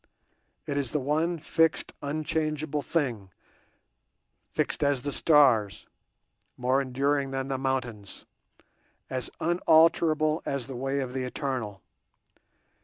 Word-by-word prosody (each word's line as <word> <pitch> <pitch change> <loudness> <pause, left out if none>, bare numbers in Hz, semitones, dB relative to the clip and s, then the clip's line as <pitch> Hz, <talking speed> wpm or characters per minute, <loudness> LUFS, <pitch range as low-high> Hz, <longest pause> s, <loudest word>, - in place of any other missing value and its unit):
It 140 - -2
is 140 -4 -1
the 150 - -1
one 155 +5 0
fixed 165 +1 +1
unchangeable 155 0 -2
thing—fixed 125 - -5
as 140 -3 +1
the 145 - -2
stars, 130 -10 +3 0.7
more 130 +2 +2
enduring 140 +1 0
than 135 0 -3
the 135 -1 -2
mountains, 125 -6 -3 0.9
as 130 -1 -2
unalterable 160 -2 +3
as 140 -3 -2
the 135 - -7
way 135 +2 -1
of 125 -1 -5
the 130 - -2
Eternal. 125 - -4
140 Hz, 110 wpm, -28 LUFS, 130-155 Hz, 0.9 s, stars